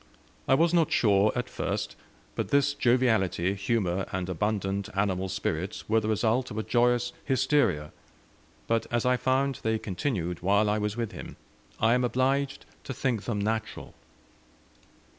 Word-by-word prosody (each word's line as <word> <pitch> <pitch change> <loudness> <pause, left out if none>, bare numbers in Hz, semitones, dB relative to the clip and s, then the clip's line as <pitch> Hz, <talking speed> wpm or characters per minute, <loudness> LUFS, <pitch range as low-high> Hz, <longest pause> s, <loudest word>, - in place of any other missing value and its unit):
I 135 - +5
was 165 +3 +3
not 170 -2 +3
sure, 105 -1 +4
at 125 +1 -2
first, - - -3 0.4
but - - -2
this 140 0 +3
joviality, 110 -9 +2
humour, 95 -2 -1
and 95 -1 -2
abundant 100 +2 -1
animal 95 -1 0
spirits 95 -1 -3
were 110 +1 +3
the 110 - -4
result 115 +4 +1
of 110 - -7
a 110 - -1
joyous 120 +1 +2
hysteria; 130 - +1 0.7
but 115 0 0
as 120 0 0
I 125 0 +4
found 130 +1 0
they 110 0 0
continued 90 - -3
while 100 +3 +3
I 105 - 0
was 105 +1 -2
with 115 -2 -2
him, - - -9 0.4
I 115 +1 +4
am 125 0 +2
obliged 135 +3 0 0.2
to 130 - -5
think 120 -6 -1
them 115 -4 -2
natural. 110 +1 -3
110 Hz, 155 wpm, -28 LUFS, 100-125 Hz, 0.7 s, I